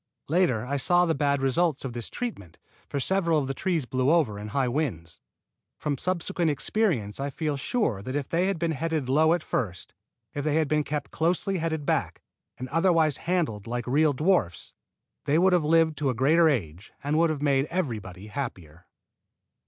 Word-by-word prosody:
Later 145 -10 +2
I 140 +3 -1
saw 175 +6 +3
the 165 - +1
bad 140 -1 +1
results 145 +2 +1
of 125 - -4
this 120 -1 -6
treatment, 155 - -6 0.3
for 140 - -2
several 170 +1 +1
of 140 -3 0
the 135 - -2
trees 170 -2 -1
blew 130 +1 0
over 150 -11 +2
in 105 - -6
high 130 +5 0
winds. 120 - -3 0.6
From 150 -2 -2
subsequent 175 +2 -1
experience 145 - 0
I 140 +1 -2
feel 150 +1 -2
sure 135 - -1
that 130 +6 -5
if 145 -2 -2
they 175 +3 +1
had 195 - 0
been 165 0 -1
headed 155 -2 -2
low 155 +5 +4
at 175 - -5
first, 95 -7 -3 0.4
if 145 - -3
they 150 0 0
had 160 -1 +2
been 150 +1 +1
kept 145 0 -4
closely 180 +3 0
headed 160 -2 -2
back - - -1 0.3
and 130 - -5
otherwise 165 -2 +2
handled 135 - 0
like 120 +1 -3
real 145 +4 +3
dwarfs, 150 - 0 0.5
they 145 - +2
would 185 +2 +4
have 175 -3 +3
lived 160 -1 +3
to 145 -3 +1
a 125 - -1
greater 160 +7 +4
age 95 - -3
and 150 +2 +1
would 165 0 +4
have 150 -2 -3
made 140 -2 +2
everybody 110 - -4
happier. 90 - -7
145 Hz, 190 wpm, -26 LUFS, 125-165 Hz, 0.6 s, low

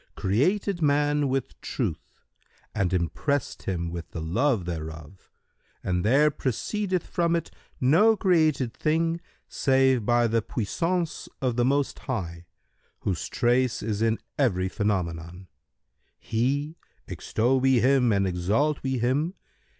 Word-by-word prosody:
created 175 - +1
man 145 -1 +2
with 135 -1 -3
Truth - - -3 0.6
and 100 -4 0
impressed 105 - -1
him 85 -3 -2
with 85 -1 -6
the - - -6
love 100 - +1
thereof 80 0 -7 0.5
and 90 -1 0
there 145 +7 +4
proceedeth 185 - -2
from 170 -1 0
it 165 -1 -3 0.3
no 175 - +5
created 155 - +2
thing 165 +3 0 0.3
save 130 -3 +2
by 120 +2 +3
the 115 0 +1
puissance 165 - -2
of 125 -3 0
the 120 - +2
Most 140 +2 +1
High, 85 -8 -5 0.5
whose 90 -8 -2
trace 125 +1 +1
is 105 -1 -2
in 115 0 +2 0.2
every 95 -9 +2
phenomenon. 90 -3 -2 0.7
He[FN#133] 140 +7 -1 0.3
(extol 125 +4 0
we 130 -1 +4
Him 130 -2 +4
and 100 -1 +2
exalt 100 +12 0
we 130 -1 -1
Him!) 140 - 0
125 Hz, 125 wpm, -26 LUFS, 95-145 Hz, 0.7 s, no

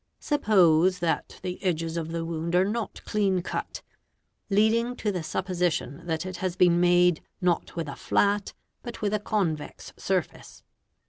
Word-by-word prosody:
Suppose 185 - +3
that 170 -2 -2
the 180 +1 -5
edges 165 -3 -1
of 165 -1 -3
the 165 0 -3
wound 165 +1 -2
are 185 +1 +4
not 215 +1 -3
clean 195 -4 +1
cut, - - -5 0.7
leading 225 +4 +2
to 210 -4 -1
the 180 -3 -3
supposition 175 -3 -2
that 160 +1 -2
it 185 -1 -5
has 180 -1 -2
been 175 -2 +4
made, 175 -1 +4 0.2
not 180 -2 0
with 165 -2 -3
a 140 - -6
flat, 205 +6 +1 0.3
but 240 -3 -8
with 205 0 0
a 210 - +1
convex 180 -8 -3
surface. - - -3
180 Hz, 155 wpm, -26 LUFS, 165-205 Hz, 0.7 s, are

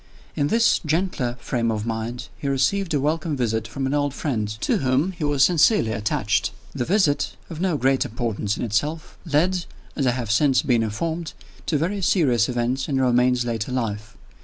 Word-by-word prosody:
In 145 - +1
this 230 +6 +3
gentler 155 -7 -1
frame 115 -1 -1
of 110 -1 -2
mind 115 +1 -4
he - - -4
received 160 +8 +1
a - - +2
welcome 155 +1 -1
visit 110 -3 -1
from 135 +4 -4
an 135 - -1
old 145 -2 0
friend, 115 -8 -1
to - - +1
whom 135 +7 +1
he 170 -4 -7
was 145 -2 +3
sincerely 170 - +4
attached. 105 0 0 0.2
The 125 -4 -2
visit 155 - +1 0.2
of 160 0 -6
no 180 -5 +1
great 135 0 +2
importance 115 -4 -2
in - - -3
itself 145 +9 -2 0.2
led, 175 +4 +2 0.3
as 135 -4 0
I - - +4
have 120 -4 -3
since 135 +4 +3
been 120 -4 +2
informed, 160 +10 -3 0.3
to 155 - +2
very 185 +7 -1
serious 130 - +2
events 125 +2 -1
in 135 -2 +1
Romayne's 125 -1 +3
later 115 0 -2
life. 110 -4 -3
130 Hz, 185 wpm, -23 LUFS, 115-155 Hz, 0.3 s, sincerely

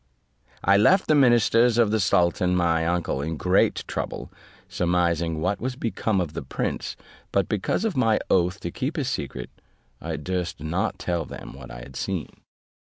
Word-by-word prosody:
I 100 +2 +5
left 185 - +5
the - - +3
ministers 120 -3 +4
of 115 -3 +4
the 110 - +2
sultan 90 -2 +2
my 85 -2 +2
uncle 85 -5 -1
in 80 +2 -3
great 90 +4 +2
trouble, - - -4 0.4
surmising 85 -2 0
what 90 +5 -1
was 130 +1 -2
become 110 -4 -1
of 85 -4 -2
the - - -4
prince: - - -3 0.4
but 100 -3 +1
because 105 - -1
of 220 - -1
my 115 -4 +3
oath 90 +2 +2
to 85 - -4
keep 135 - -3
his 140 -6 -1
secret, 65 -4 -5 0.5
I - - -3
durst 90 +4 -3
not 80 +5 -2
tell 85 -2 -1
them - - -9
what 65 -2 -11
I - - -8
had 65 +2 -12
seen. - - -3
90 Hz, 170 wpm, -25 LUFS, 85-110 Hz, 0.5 s, I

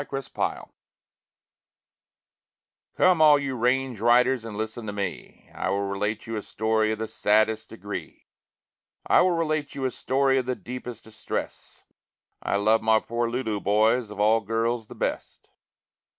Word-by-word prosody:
THE 145 - -8
RANGE 135 -2 -5
RIDERS - - -2 2.3
Come 185 -3 +4
all 150 -1 +7
you 140 -2 -3
range 125 0 0
riders 125 +1 +4
and 105 -2 -7
listen 110 +1 -4
to - - -2
me, 100 -1 -6
I - - -2
will 100 +1 0
relate 105 +2 -2
you 115 -1 -4
a - - -3
story 110 +1 0
of 110 - -2
the 110 +1 -4
saddest 110 +1 +1
degree, 105 -2 -8 0.8
I - - +5
will 185 - +4
relate 155 -4 -1
you 135 - -3
a 130 - 0
story 135 +2 +1
of 130 - -4
the 130 - 0
deepest 125 -2 -8
distress, 110 0 -6 0.6
I - - -1
love 110 +2 +3
my 110 0 +4
poor 115 +1 -2
Lulu, 115 -4 -2
boys, 110 +4 +2
of 105 -1 -9
all 110 +2 +4
girls 115 +2 -1
the - - -11
best. - - -4
115 Hz, 160 wpm, -25 LUFS, 110-130 Hz, 2.3 s, all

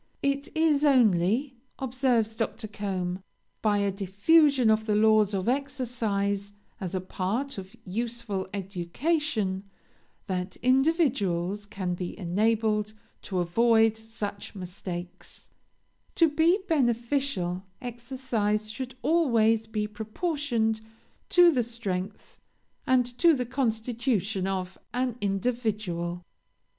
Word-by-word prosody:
'It 280 +1 0
is 310 -3 +3
only,' 240 - +3 0.2
observes 250 -4 +1
Dr. 225 0 -2
Combe, 190 -3 -3 0.4
'by 210 -2 +2
a 200 -1 +1
diffusion 230 - +4
of 220 +1 +1
the 210 - +2
laws 215 -1 +4
of 190 +1 -2
exercise 230 -7 -1 0.3
as 190 -2 -4
a - - +1
part 205 +8 -2
of 190 +1 -10
useful 225 -1 -3
education, 200 - -1 0.6
that 185 0 -3
individuals 235 - +2
can 190 -3 -3
be 175 0 -5
enabled 215 +3 +1 0.3
to 190 - -4
avoid 225 +5 +4
such 220 -2 -6
mistakes,' 180 -1 -7 0.7
To 330 - +5
be 325 +5 +4
beneficial, 240 - 0 0.2
exercise 235 -4 -2
should 255 +3 -6
always 225 -9 +3
be 215 -1 -2
proportioned 220 +1 -1 0.5
to 350 -1 +7
the 255 -5 +2
strength 210 -4 -5 0.5
and 255 -1 +4
to 335 -2 +6
the 250 -2 -2
constitution 225 -5 -1
of 190 -1 -3 0.2
an 250 -2 0
individual. 195 -5 -1
220 Hz, 105 wpm, -27 LUFS, 195-255 Hz, 0.7 s, to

